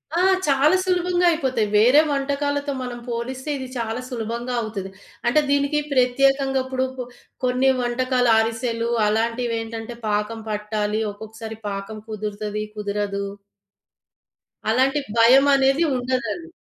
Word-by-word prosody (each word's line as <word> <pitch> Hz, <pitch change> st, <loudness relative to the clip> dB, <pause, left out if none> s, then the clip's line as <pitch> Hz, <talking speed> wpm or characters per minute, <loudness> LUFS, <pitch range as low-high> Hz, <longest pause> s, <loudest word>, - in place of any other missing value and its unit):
ఆ! 350 Hz, -, +2 dB, 0.3 s
చాలా 285 Hz, +5 st, +4 dB
సులభంగా 360 Hz, -1 st, +1 dB
అయిపోతాయి. 260 Hz, -9 st, 0 dB
వేరే 250 Hz, +8 st, +6 dB
వంటకాలతో 285 Hz, +1 st, -1 dB
మనం 245 Hz, -1 st, -5 dB
పోలిస్తే 255 Hz, +4 st, -4 dB
ఇది 260 Hz, -1 st, -6 dB
చాలా 230 Hz, +1 st, -3 dB
సులభంగా 235 Hz, +1 st, -4 dB
అవుతది. 200 Hz, -3 st, -5 dB, 0.4 s
అంటే 305 Hz, +5 st, +4 dB
దీనికి 285 Hz, +1 st, +2 dB
ప్రత్యేకంగా 270 Hz, +1 st, +3 dB
ఇప్పుడు 260 Hz, 0 st, -1 dB
పొ 250 Hz, -, -4 dB, 0.4 s
కొన్ని 255 Hz, +2 st, +3 dB
వంటకాలు 245 Hz, 0 st, +1 dB
అరిసెలు 230 Hz, +1 st, 0 dB, 0.2 s
అలాంటివెంటంటే 230 Hz, +1 st, -2 dB
పాకం 210 Hz, +2 st, -1 dB
పట్టాలి, 210 Hz, 0 st, -1 dB
ఒక్కొక్కసారి 220 Hz, +1 st, -9 dB
పాకం 200 Hz, +2 st, -6 dB
కుదురుతది, 210 Hz, 0 st, -4 dB
కుదరదు. 200 Hz, -1 st, -2 dB, 1.4 s
అలాంటి 265 Hz, +5 st, +3 dB, 0.2 s
భయమనేది 270 Hz, +5 st, +5 dB
ఉండదండి. 255 Hz, +7 st, -3 dB
245 Hz, 110 wpm, -22 LUFS, 220-270 Hz, 1.4 s, వేరే